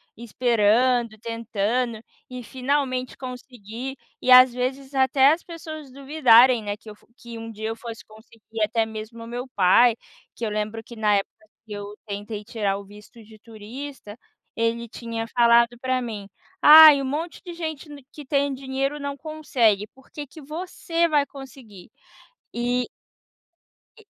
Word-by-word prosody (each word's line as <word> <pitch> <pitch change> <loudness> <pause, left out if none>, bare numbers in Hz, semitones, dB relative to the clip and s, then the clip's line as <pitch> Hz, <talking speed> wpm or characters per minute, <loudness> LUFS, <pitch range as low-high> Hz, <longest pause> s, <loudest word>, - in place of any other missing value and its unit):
esperando, 235 0 +1
tentando 230 +1 -2 0.3
e 250 0 -7
finalmente 255 0 -2
conseguir. 250 0 -8 0.2
E, 255 - +1
as 255 -1 +9
vezes 265 +2 -4
até 265 +2 +4
as 335 - -5
pessoas 315 -4 -9
duvidarem, 255 -4 +4
né, 205 0 -4
que 220 - -14
eu 210 - -10
fo - - -27
que 235 -4 -10
um 225 0 -8
dia 220 0 -6
eu 225 - -3
fosse 230 -1 -9
conseguir, 220 0 -11
até 220 +1 +1
mesmo 220 +1 -8
o - - -11
meu 245 +2 -5
pai, 220 +5 +5 0.4
que 230 - -4
eu - - -2
lembro 215 +1 -3
que 235 - -12
na 210 -2 +2
época 195 - -4 0.3
que 210 - -9
eu 205 0 -7
tentei 205 0 -6
tirar 205 -4 -2
o 200 - -10
visto 210 +3 -15
de 215 0 -16
turista, 225 +1 -10 0.4
ele 230 +1 -1
tinha 230 -1 -5
falado 235 0 +4
pra 255 0 -1
mim: 215 -4 -6 0.4
"Ai, 305 -1 +10
um 275 - -3
monte 310 +5 -4
de 350 - -7
gente 315 -3 -6
ne 290 -2 -11
que 295 - -11
tem 280 0 0
dinheiro 270 +2 -3
não 280 0 -4
consegue, 265 -10 0
por 265 0 -22
que 295 - -7
que 285 +4 -14
você 335 +3 -2
vai 295 -3 +1
conseguir?" 260 -9 -13 0.6
E 245 +1 -1 1.1
E 440 - -18
240 Hz, 160 wpm, -23 LUFS, 220-275 Hz, 1.1 s, Ai